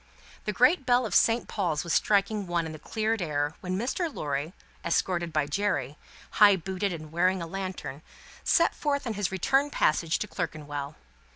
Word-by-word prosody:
The 210 - 0
great 255 - +4
bell 245 -1 +3
of 210 - -4
Saint 230 +5 +3
Paul's 170 -7 -1
was 170 - -2
striking 205 -1 +2
one 170 -1 0
in 160 - -5
the 155 - -9
cleared 220 +5 -1
air, 150 -2 -1
when 185 0 -2
Mr. 290 - -1
Lorry, 145 - -3 0.3
escorted 170 0 0
by 155 -2 +1
Jerry, 145 -4 -1 0.5
high 205 -1 +9
booted 190 +2 -2
and 155 -3 -7
bearing 185 +3 +2
a 170 - -4
lantern, 185 -5 -5 0.4
set 335 - +3
forth 285 -2 -1
on 230 - -2
his 205 -3 -2
return 270 +10 +2
passage 160 - +1
to 210 - -4
Clerkenwell. 150 -5 -5
185 Hz, 175 wpm, -28 LUFS, 155-215 Hz, 0.5 s, high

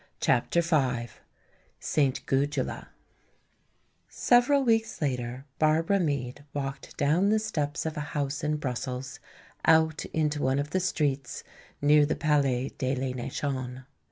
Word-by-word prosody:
CHAPTER 150 +8 +2
V 130 -8 +1 0.7
St. 140 -4 0
Gudula 140 0 -1 1.2
Several 255 +3 +3
weeks 225 -2 +1
later 125 -2 -2
Barbara 160 +5 +3
Meade 140 -6 -2
walked 135 -1 -5
down 165 +8 +3
the 215 - +4
steps 150 -10 -2
of 160 -1 -3
a 150 0 -4
house 140 +2 -2
in 150 0 +1
Brussels 130 -1 -4 0.4
out 160 -1 +4
into 150 -2 -1
one 130 0 +1
of 145 +1 -2
the 185 - +1
streets 145 -8 -1 0.4
near 150 0 +5
the - - 0
Palais 140 -4 +1
de 130 0 0
la 130 0 -2
Nation. 130 0 -4
145 Hz, 130 wpm, -28 LUFS, 130-160 Hz, 1.2 s, near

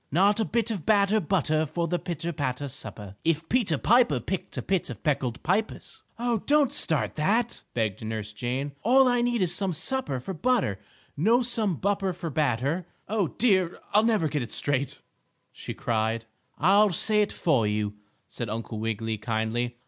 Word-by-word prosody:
"Not 200 +7 +4
a 220 - +2
bit 230 -1 0
of 195 -8 -4
batter 205 +1 +3
butter 155 -4 +1
for 170 +3 -2
the 175 +1 -1
pitter 170 -1 -4
patter 140 -1 -2
supper. 100 -6 -7
If 165 0 0
Peter 215 - +2
Piper 225 - +4
picked 185 - -4
a - - -2
pit 190 -3 0
of 120 -5 -8
peckled 135 -5 -1
pippers 200 +7 -2
" - - -41
"Oh, 235 -1 0
don't 290 -3 +4
start 160 - 0
that!" 220 +9 +1
begged 110 -4 -1
Nurse 110 -1 -4
Jane. 125 +6 -3
"All 260 +4 +5
I 245 -1 +2
need 240 -4 +1
is 175 -1 +1
some 190 -1 0
supper 160 - 0
for 190 +10 -6
butter 185 - +1 0.4
no 225 - +3
some 225 -6 +1
bupper 195 +1 0
for 170 -2 -5
batter 150 +4 0 0.2
oh, 210 -3 +1
dear! 190 -4 +2 0.2
I'll 210 - +6
never 220 -8 +2
get 150 -1 -1
it 120 - -6
straight!" 140 -2 -1 0.5
she - - -7
cried. 115 0 -1 0.3
"I'll 200 +6 +5
say 210 +4 +2
it 205 - 0
for 130 -10 +1
you," 105 0 -1 0.3
said 120 -3 -5
Uncle 110 0 -4
Wiggily, 110 0 -2
kindly. 115 +2 -2
165 Hz, 180 wpm, -27 LUFS, -, 0.5 s, I'll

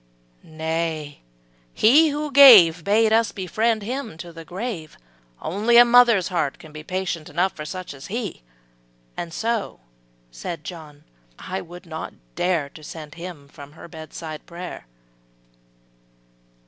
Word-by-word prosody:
``Nay, 160 -2 -4 0.6
He 295 +9 +5
who 295 0 -3
gave, 205 -12 +8
Bade 220 +3 +3
us 225 -2 +3
befriend 215 +4 -1
him 235 - -5
to 170 0 -9
the 165 0 -10
grave; 180 -3 -6 0.4
Only 215 +7 +2
a 240 - +10
mother's 235 -6 +5
heart 165 -6 -1
can 155 - -14
be 155 0 -9
Patient 175 -1 -4
enough 180 +5 0
for 150 - -7
such 185 +1 -6
as 135 0 -11
he; 220 - -5 0.7
And 170 - -5
so,'' 225 +4 -2 0.5
said 150 - -7
John, 155 -3 -10 0.3
``I 190 +1 -5
would 175 +2 -12
not 160 -1 -7 0.2
dare 170 - 0
To 155 - -14
send 150 -1 -9
him 170 -5 -9
from 145 0 -13
her 160 - -12
bedside 160 -1 -9
prayer.'' 175 - -8
175 Hz, 135 wpm, -23 LUFS, 160-220 Hz, 0.7 s, a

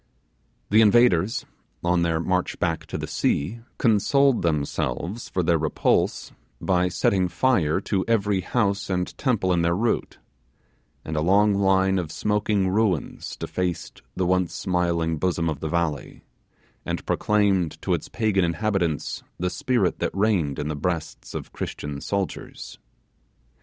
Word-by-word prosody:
The 110 +2 +6
invaders, 110 -1 +4 0.4
on 85 0 +2
their 85 -1 +1
march 90 +2 -1
back 85 -1 -2
to - - -4
the - - -4
sea, 90 +12 -1 0.2
consoled 125 +4 +3
themselves 80 - -2
for 90 - -1
their 85 0 +2
repulse 80 -1 0 0.3
by 90 -1 +1
setting 90 +1 +1
fire 90 -4 +2
to 95 -1 -1
every 105 -4 +1
house 100 0 0
and 90 -1 -2
temple 105 -9 +1
in 85 - +2
their 85 0 +2
route; 115 +4 -1 0.9
and 80 - -4
a 75 - +1
long 100 +5 +4
line 95 -1 +3
of 80 -3 -4
smoking 105 -1 0
ruins 95 -5 -1
defaced 90 -2 -4
the 95 - 0
once 90 -1 +1
smiling 85 -3 0
bosom 85 -1 0
of 75 -4 -2
the 80 - -3
valley, 85 -4 -2 0.6
and - - -4
proclaimed 100 -6 +1
to - - +1
its - - -3
pagan 105 -5 +1
inhabitants 85 -3 -1 0.2
the 90 +1 -1
spirit 125 +5 0
that - - -2
reigned 95 -10 +1
in 75 - -3
the 75 - -2
breasts 80 +1 -4
of - - -6
Christian 70 -1 -5
soldiers. 100 -2 -4
90 Hz, 140 wpm, -24 LUFS, 85-105 Hz, 0.9 s, The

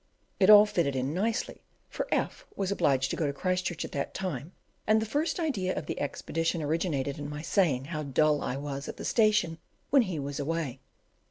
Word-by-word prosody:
It 190 0 +5
all 210 0 +10
fitted 170 -10 0
in 130 +3 -1
nicely, 215 +6 -1 0.3
for - - -4
F - - -1
was 195 -1 -1
obliged 135 -8 +2
to - - -1
go 155 - 0
to 140 - -2
Christchurch 180 +2 -1
at - - -9
that 140 -1 -3
time, 170 -5 -4 0.4
and 215 0 +5
the 220 - -1
first 295 - -1
idea 215 - -1
of - - -3
the - - -4
expedition 165 +3 -1
originated 145 -3 -1
in 145 0 -5
my 150 +1 -6
saying 155 -10 +2
how 155 0 -4
dull 150 +1 +2
I 130 - -2
was 140 -1 -5
at - - -7
the - - -6
station 210 -8 +2 0.3
when 275 -1 +7
he 185 -8 -2
was 140 0 -4
away. 145 -3 -2
165 Hz, 200 wpm, -29 LUFS, 140-195 Hz, 0.4 s, all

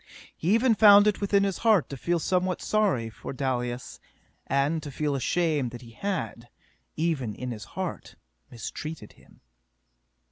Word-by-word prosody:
He 180 +7 +2
even 235 +1 +4
found 205 -1 +8
it 210 -1 +1
within 200 0 +3
his 195 -3 -1
heart 220 -8 +3
to - - -4
feel 170 +6 0
somewhat 185 +2 0
sorry 200 - +1
for 110 - -8
Dalis, 125 -2 -3 0.5
and 140 +4 +1
to 150 - -7
feel 145 +1 -2
ashamed 150 0 0
that 120 +1 -10
he 115 - -13
had, 120 - -4 0.5
even 150 -10 -1
in 125 +2 -5
his 110 -1 -7
heart, 185 -2 -5 0.3
mistreated 120 +2 -7
him. - - -23
155 Hz, 150 wpm, -27 LUFS, 125-195 Hz, 0.5 s, found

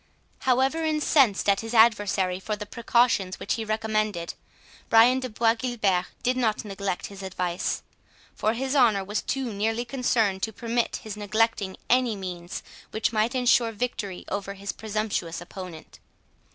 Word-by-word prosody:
However 265 +5 +2
incensed 300 - +3
at 200 -1 +4
his 225 +1 -5
adversary 205 -5 +4
for 210 +2 -3
the 210 0 -6
precautions 230 -4 +1
which - - -1
he 225 - -2
recommended, 215 -5 -1 0.6
Brian 235 +3 +6
de 255 -1 -4
Bois 225 +1 +3
Guilbert 220 -7 0 0.2
did 250 +1 +2
not 225 -4 0
neglect 200 -2 -3
his 200 -1 -9
advice; 180 -2 -2 0.5
for 215 +1 0
his 265 +3 -2
honour 225 -7 +4
was 210 +2 -2
too 260 -4 -2
nearly 225 +4 -1
concerned, 230 -7 +1
to 220 - -1
permit 235 +2 -1
his 215 -2 -6
neglecting 210 -1 0
any 250 -3 +3
means 180 -2 -6 0.3
which 220 -1 -1
might 220 +4 +1
ensure 245 -2 +3
victory 210 -4 -4
over 200 0 -4
his 200 0 -4
presumptuous 215 -6 -3
opponent. 175 -2 -10
215 Hz, 150 wpm, -26 LUFS, 195-240 Hz, 0.6 s, Brian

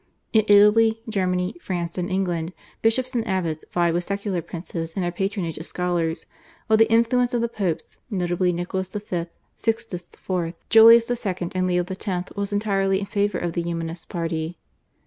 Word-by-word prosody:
In 220 -1 +5
Italy, 210 +2 +6
Germany, 185 -3 0
France, 175 -2 -3
and 180 - -2
England, 180 -3 -1 0.3
bishops 255 +4 +1
and 235 -2 -1
abbots 170 -5 -1
vied 170 -1 +2
with 175 +1 0
secular 200 -2 -2
princes 165 -1 -6
in 190 - -2
their 175 - -1
patronage 190 -3 -2
of 160 - -6
scholars, 170 -2 -1 0.4
while 220 - +4
the 225 - +5
influence 245 +2 +3
of 235 - +1
the 235 - +1
Popes, 195 -8 -3
notably 180 -3 0
Nicholas 180 +2 -3
V., 185 -4 -4 0.3
Sixtus 225 -6 -2
IV., 175 -3 -3 0.2
Julius 230 +1 +8
II., 185 -7 -2
and 185 0 +1
Leo 180 -1 +1
X. 185 -1 -4
was 200 0 -2
entirely 195 -2 +1
in 200 - -3
favour 200 -1 0
of 175 -1 -2
the 170 - -1
Humanist 165 0 -5
party. 165 0 -3
185 Hz, 165 wpm, -24 LUFS, 175-210 Hz, 0.4 s, Julius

